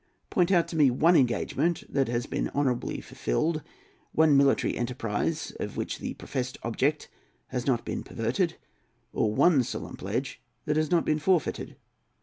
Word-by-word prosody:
Point 180 0 +2
out 175 -3 +4
to - - -6
me 150 -4 +5
one 165 +8 +4
engagement 140 +5 +1
that 135 -2 0
has 120 +1 -1
been - - -2
honourably 130 -4 0
fulfilled, 155 - -1 0.5
one 155 -2 +5
military 140 0 +3
enterprise 120 +5 -2
of - - -5
which - - -3
the - - -5
professed 130 -1 -4
object 135 +6 0 0.4
has 125 0 -3
not 125 -4 +1
been - - -3
perverted, - - -1 0.6
or 110 - +1
one 150 +5 +4
solemn 120 - -5
pledge 115 +8 -3 0.2
that 150 - 0
has 155 -1 +1
not 170 -2 +2
been 155 0 +1
forfeited. 170 -1 0
140 Hz, 155 wpm, -28 LUFS, 120-160 Hz, 0.6 s, me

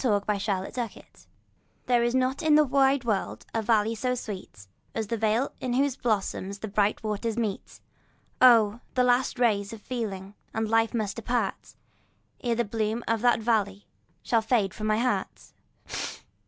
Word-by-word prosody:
The 260 - +1
Meeting 205 0 0
of 190 -1 -3
the 250 - -1
Waters 230 -4 -10 0.6
THERE 245 -1 +3
is 240 +1 +1
not 260 +1 +1
in 310 -2 +4
the 305 - +7
wide 270 0 +3
world 215 -5 -2
a 225 - 0
valley 220 0 +2
so 250 +3 -1
sweet 190 - -7 0.3
As 225 - -1
that 230 +2 -3
vale 225 +5 +1
in 250 -1 -2
whose 275 0 +2
bosom 210 -5 -1
the 200 +2 -6
bright 205 +2 +1
waters 215 +1 -2
meet; 215 -4 -3 0.6
Oh! 230 -3 +6 0.2
the 250 - +4
last 250 +1 +2
rays 210 -5 +1
of 225 - -8
feeling 205 -5 -5 0.2
and 220 0 0
life 225 +1 +2
must 215 -2 -2
depart, 230 -3 -2 0.7
Ere 240 -2 +1
the 235 - 0
bloom 220 +2 -2
of 230 -1 +1
that 240 -2 +3
valley 205 -3 0 0.4
shall 230 -2 +2
fade 220 -4 +1
from 215 -1 -4
my 215 0 +2
heart. 250 +2 -2
225 Hz, 170 wpm, -27 LUFS, 210-245 Hz, 0.7 s, the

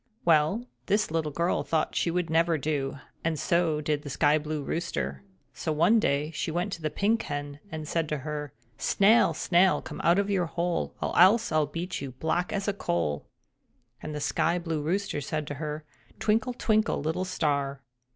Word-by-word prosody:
Well, 165 +8 +3 0.2
this 205 -3 +1
little 160 -2 -1
girl 170 +4 0
thought 160 -1 0
this - - 0
would 180 0 0
never 165 0 +3
do, 140 -2 -2 0.3
and 160 -2 -1
so 170 -3 +1
did 150 -1 -1
the 145 - -8
Sky 145 +3 +3
blue 150 -1 -4
Rooster. 70 - -3 0.3
So, 160 - -3
one 170 +9 +4
day, 150 -4 0
she 165 - -3
went 175 +5 -1
to 170 - -6
the 155 - -1
Pink 220 +7 +1
Hen 145 -5 -5
and 155 -1 -5
said 165 -1 -1
to 150 - -1
her: 150 0 -5 0.3
"Snail, 215 +4 +4
snail, 185 +2 +3
come - - -7
out 170 +2 +4
of 200 0 +1
your 180 -3 +1
hole, 170 +1 -2
or - - -2
else 210 +6 +6
I'll 155 -1 +2
beat 170 +4 -4
you 140 - -4
as 130 - -11
black 170 +5 -1
as 200 0 -2
a 205 - +1
coal!" 85 - -2 0.7
And 155 -1 -5
the - - -3
Sky 165 +3 +1
blue 165 -3 -2
Rooster 170 0 -1
said 155 +2 -3
to 145 - -5
her: 150 0 -4 0.3
"Twinkle, 225 +4 +1
twinkle, 215 -2 +1
little 160 +4 -1
star!" 140 -6 -1
160 Hz, 190 wpm, -28 LUFS, 150-180 Hz, 0.7 s, else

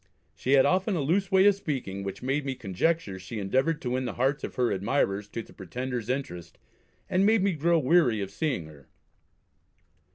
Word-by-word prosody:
She 130 - -1
had 135 -1 +6
often 190 +2 +2
a 165 - 0
loose 185 +7 0
way 190 0 +5
of 205 - +7
speaking, 130 - -4
which 100 +4 -6
made 135 +3 0
me 135 -1 -3
conjecture 100 - -1
she 95 +5 -7
endeavoured 130 +10 0
to 125 - -2
win 130 +1 -1
the 120 - -3
hearts 135 +3 0
of - - -5
her 125 -2 +1
admirers 100 0 0
to 115 +2 -6
the - - -17
Pretender's 125 +4 -5
interest, 105 - -4 0.5
and 190 0 +2
made 215 -1 +4
me 200 - +3
grow 170 +2 +2
weary 135 -6 +3
of 100 -1 -4
seeing 125 - -2
her. 75 -4 -15
130 Hz, 195 wpm, -27 LUFS, 100-165 Hz, 0.5 s, of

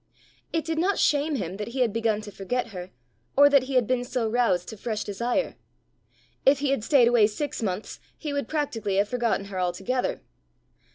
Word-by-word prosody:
It 325 -1 -1
did 325 -1 -1
not 380 +4 +2
shame 295 +1 +2
him 190 -5 -4
that 210 - -4
he 255 +2 -3
had 230 -5 +2
begun 220 -2 0
to 210 -1 -9
forget 235 +6 -3
her, 180 -3 -7 0.5
or 285 +1 +8
that 280 -2 +5
he 265 0 -4
had 250 -2 +4
been 250 +1 0
so 245 -2 -1
roused 220 -7 +1
to 220 - -8
fresh 215 0 -3
desire. 235 +7 -1 0.9
If 275 +1 +5
he 280 0 0
had 275 -6 0
stayed 250 -1 +5
away 235 -3 +5
six 260 +7 -4
months, 200 -1 -3 0.2
he 300 -3 -4
would 280 -4 -2
practically 230 -10 -2
have 200 +1 +2
forgotten 235 -5 0
her 195 -2 -5
altogether. 190 +8 -1
235 Hz, 195 wpm, -26 LUFS, 205-275 Hz, 0.9 s, or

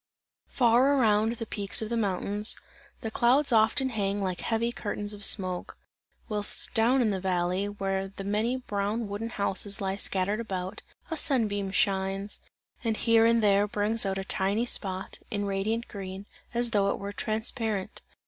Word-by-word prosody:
Far 255 +3 +3
around 220 -2 +3
the 230 -1 -6
peaks 200 -3 0
of 215 - -5
the 235 - -1
mountains, 205 0 +2 0.4
the 225 -3 -4
clouds 255 +5 +3
often 225 +4 +3
hang 205 -3 -1
like 185 -3 -3
heavy 230 +1 0
curtains 205 -2 -1
of 205 0 -9
smoke; 185 -3 +2 0.5
whilst 210 -2 0
down 240 +3 +3
in 215 - +1
the 195 - -2
valley, 185 +1 -1
where 195 -1 -2
the 195 0 -9
many 215 +5 0
brown 210 -1 -2
wooden 205 +3 -4
houses 200 -1 +1
lie 195 0 -2
scattered 200 +2 -1
about, 190 -2 -4 0.3
a 325 - -2
sun 255 -7 +4
beam 200 -1 -3
shines, 195 +1 0 0.4
and 225 -2 -1
here 230 -1 +4
and 230 -1 +3
there 205 0 +4
brings 210 +2 +1
out 195 -1 -1
a 195 - -3
tiny 200 +4 0
spot, 190 -5 -2
in 205 -1 -2
radiant 205 +4 -2
green, 195 -1 -7 0.3
as 240 0 0
though 200 -2 +2
it - - -1
were 200 +1 -6
transparent. 220 -2 -2
205 Hz, 165 wpm, -28 LUFS, 195-230 Hz, 0.5 s, sun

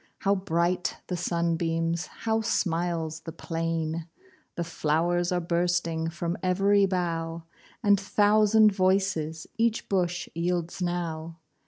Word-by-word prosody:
How 200 - +3
bright 180 -2 0
the 180 - -3
sunbeams! 170 0 0
How 225 0 -1
smiles 170 -6 -1
the 165 - -8
plain! 165 0 -3 0.5
The 170 - -1
flow'rs 170 +2 0
are 180 - +1
bursting 170 -1 0
From 170 +1 -3
ev'ry 195 +2 +3
bough, 165 -3 -2 0.4
And 205 -2 +5
thousand 210 +2 +4
voices 185 -5 +1
Each 230 0 +1
bush 180 -2 0
yields 175 +1 -2
now. 165 -2 -3
175 Hz, 115 wpm, -27 LUFS, 165-190 Hz, 0.5 s, And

